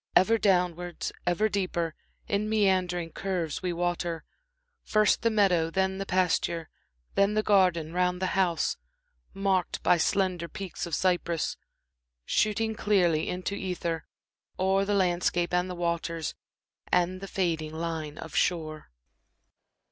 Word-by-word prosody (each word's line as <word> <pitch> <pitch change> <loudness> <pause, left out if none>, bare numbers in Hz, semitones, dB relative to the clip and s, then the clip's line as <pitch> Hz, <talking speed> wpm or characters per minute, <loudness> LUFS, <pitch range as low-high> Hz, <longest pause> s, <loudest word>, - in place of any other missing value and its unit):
Ever 225 +5 +5
downwards, 180 -3 0 0.2
ever 190 +5 +3
deeper, 180 -5 -1 0.3
in 210 0 0
meandering 185 -5 +1
curves 180 -6 -2
we 180 -1 -1
water 175 -2 -2 0.6
First 215 -1 +3
the 230 - +3
meadow, 190 -7 +3
then 190 +2 0
the 195 - -4
pasture; 175 -2 0 0.4
then 200 +1 +3
the 215 - +2
garden 180 -6 +3
round 180 0 +1
the 185 0 -1
house, 180 -3 +1 0.6
Marked 195 -2 0
by 180 - +5
slender 180 0 +1
peaks 195 -2 -6
of 165 - -1
cypress, 175 -3 0 0.7
shooting 220 +1 +1
clearly 180 -7 +2
into 180 +2 -3
ether 175 -4 -3 0.5
O'er 190 +1 +2
the 205 0 +1
landscape 175 -2 +1
and 180 +1 +1
the 180 - -4
waters 170 -2 -2 0.6
and 180 +1 +2
the 195 - -6
fading 165 -5 -1
line 160 -2 -4
of 160 - -8
shore. 155 -3 0
180 Hz, 130 wpm, -28 LUFS, 170-195 Hz, 0.7 s, Ever